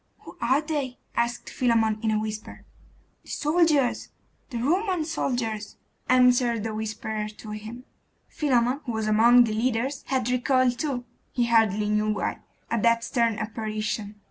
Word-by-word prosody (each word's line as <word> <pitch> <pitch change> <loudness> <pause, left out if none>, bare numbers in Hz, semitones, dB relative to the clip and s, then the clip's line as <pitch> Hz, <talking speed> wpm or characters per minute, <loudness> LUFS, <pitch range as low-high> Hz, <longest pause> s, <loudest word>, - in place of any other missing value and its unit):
'Who - - -12
are 260 +5 +3
they?' 290 -5 -3 0.2
asked 235 +1 -1
Philammon 225 -3 +2
in 225 - 0
a 215 -1 +2
whisper. 215 0 -6 0.6
'The - - -19
soldiers 300 -4 +2 0.4
the 245 - -4
Roman 350 - 0
soldiers,' 230 -9 -3 0.3
answered 245 -3 +4
a 220 - -3
whisperer 215 0 -3
to 215 0 -10
him. 220 +4 -7 0.4
Philammon, 255 -1 +1
who 235 - -2
was 220 -1 -2
among 235 +3 +6
the 220 -2 -1
leaders, 250 +4 -1
had 260 -3 0
recoiled 250 0 +2
too 265 -5 -2 0.3
he 240 -2 +1
hardly 220 -3 +3
knew 210 0 +1
why 210 - -2 0.3
at 230 - +1
that 230 0 +3
stern 230 -4 +1
apparition. 215 -1 -3
235 Hz, 145 wpm, -26 LUFS, 215-255 Hz, 0.6 s, among